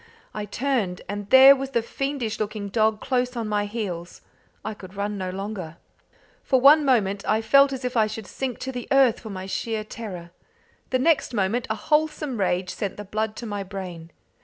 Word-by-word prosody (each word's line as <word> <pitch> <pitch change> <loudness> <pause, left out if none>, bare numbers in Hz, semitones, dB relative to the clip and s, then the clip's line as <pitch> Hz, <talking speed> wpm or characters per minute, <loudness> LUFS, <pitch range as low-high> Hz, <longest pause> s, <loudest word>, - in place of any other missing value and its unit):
I 210 -1 -4
turned, 210 -5 -1
and 205 0 -5
there 265 +2 +9
was 270 0 -4
the 230 - +1
fiendish 265 -2 -3
looking 210 -1 -3
dog 215 0 +1
close 250 -1 -1
on 230 -2 -3
my 205 -1 0
heels. 185 -6 -5 0.4
I 215 - -3
could 190 -2 -12
run 205 +1 -2
no 185 -2 -3
longer. 190 -4 -6 0.7
For 260 - +3
one 295 +4 +7
moment 205 -7 +2
I 215 - +3
felt 275 +5 +5
as 265 -1 -5
if 250 - -3
I 220 -2 +4
should 215 0 -7
sink 255 +5 -4
to 265 - -3
the 245 -2 -6
earth 270 -4 +4
for 190 -4 -7
sheer 220 +2 -2
terror. 190 -6 -8 0.6
The 255 - +2
next 275 -2 +2
moment 210 +4 0
a 220 - 0
wholesome 300 0 0
rage 180 -1 0
sent 200 -3 -4
the 210 - -7
blood 215 +2 -2
to 235 - -7
my 205 -2 -4
brain. 185 -4 -7
215 Hz, 190 wpm, -24 LUFS, 200-255 Hz, 0.7 s, there